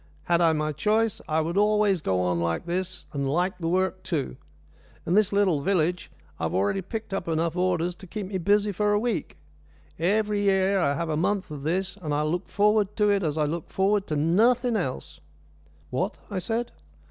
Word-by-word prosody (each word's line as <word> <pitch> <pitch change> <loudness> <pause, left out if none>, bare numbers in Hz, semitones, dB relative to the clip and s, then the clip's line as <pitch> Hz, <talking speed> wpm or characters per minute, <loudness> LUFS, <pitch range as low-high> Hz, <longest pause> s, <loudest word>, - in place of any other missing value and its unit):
Had 170 0 +2
I 165 -1 +5
my 155 0 -1
choice, 215 +7 +1
I 155 +1 +1
would 170 +4 -2
always 210 -3 +3
go 95 -6 0
on 90 -1 0
like 85 - -1
this, 185 +1 -3
and 140 -1 -2
I - - -1
like 180 +6 0
the 165 - -2
work 185 +2 0
too. 160 -7 -3 0.7
In 170 - 0
this 210 0 +4
little 195 -7 +2
village 180 0 0 0.3
I've 80 - -2
already 100 - +1
picked 215 +2 -6
up 195 -3 -3
enough 165 0 0
orders 180 -1 0
to 190 - -12
keep 210 +2 -5
me 190 0 -3
busy 205 +3 +2
for 205 +2 +1
a 205 - +3
week. 240 +2 -2 0.6
Every 205 +4 +1
year 195 0 +2
I 140 -5 +1
have 170 +1 -3
a 155 - 0
month 185 +2 -1
of 145 -2 -6
this, 185 +6 -2
and 155 -7 -3
I 150 - +1
look 165 +3 -2
forward 210 0 +2
to 210 -1 +3
it 200 -1 +2
as 155 -3 -1
I 155 - +2
look 160 +2 -4
forward 195 +1 +1
to 155 - -2
nothing 225 - +3
else." 130 - -3 0.7
"What?" 185 - -1
I 195 - -1
said. 230 +5 -2
185 Hz, 205 wpm, -26 LUFS, 160-205 Hz, 0.7 s, I